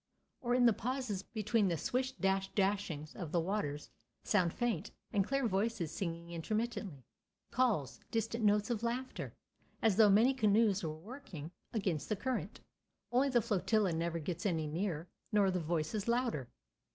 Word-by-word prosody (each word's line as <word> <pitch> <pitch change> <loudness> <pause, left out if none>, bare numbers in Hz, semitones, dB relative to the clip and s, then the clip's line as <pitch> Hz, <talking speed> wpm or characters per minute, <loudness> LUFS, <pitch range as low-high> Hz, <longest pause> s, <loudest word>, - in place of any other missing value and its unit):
Or, 245 -1 +1
in 250 -1 +5
the 235 - +7
pauses 245 -3 -2
between 215 0 +1
the 170 -2 +1
swish 255 - -1
dash 195 -3 0
dashings 190 -7 0
of 170 -5 -5
the 175 - +2
waters, 165 -5 -2 0.3
sound 185 -5 +3
faint 230 -7 -1 0.2
and 200 - +4
clear 275 +3 +1
voices 200 -4 0
singing 170 -2 -4
intermittently, 205 - -3 0.5
calls, 220 - +1
distant 230 0 -1
notes 210 +2 +3
of 225 -3 -1
laughter, 245 +2 -3 0.4
as 215 -4 +3
though 220 -2 +8
many 225 +7 +6
canoes 215 -4 +3
were 155 -1 -3
working 175 - -8 0.2
against 185 -9 -1
the 215 - +2
current—only 245 - -3
the 240 -4 +3
flotilla 210 -3 +2
never 170 +1 -1
gets 170 +2 -4
any 165 -6 +1
nearer, 165 +1 -2 0.2
nor 205 -3 +4
the 180 - 0
voices 170 +5 -1
louder. 235 - 0
205 Hz, 150 wpm, -35 LUFS, 170-230 Hz, 0.5 s, though